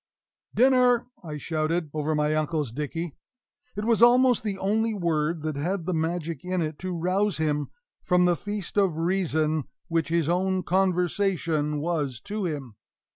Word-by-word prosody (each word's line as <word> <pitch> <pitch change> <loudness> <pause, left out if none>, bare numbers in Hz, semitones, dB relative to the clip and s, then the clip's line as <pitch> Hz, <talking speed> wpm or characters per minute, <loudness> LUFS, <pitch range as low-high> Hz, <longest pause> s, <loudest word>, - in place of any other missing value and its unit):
"Dinner!" 250 -1 +4 0.2
I 155 -3 -6
shouted 155 +1 -1
over 155 0 -1
my 150 0 +1
uncle's 155 -4 -1
dickey. 150 +5 -4 0.7
It 210 - -2
was 230 -1 +2
almost 245 0 +6
the 205 -3 -3
only 220 +3 0
word 165 -3 0
that 155 -2 -2
had 170 +5 -2
the 185 - -1
magic 165 -2 -2
in 180 0 -1
it 155 -2 -3
to 185 -1 -4
rouse 185 +4 +1
him 150 -2 0 0.3
from 180 0 +3
the 175 -1 +3
feast 205 +1 -5
of 190 -6 +2
reason 160 -4 0 0.2
which 165 -1 0
his 165 -2 +1
own 185 +2 +1
conversation 180 -4 +1
was 150 -7 -2
to 210 -1 -4
him. 135 -9 -6
170 Hz, 155 wpm, -26 LUFS, 155-195 Hz, 0.7 s, almost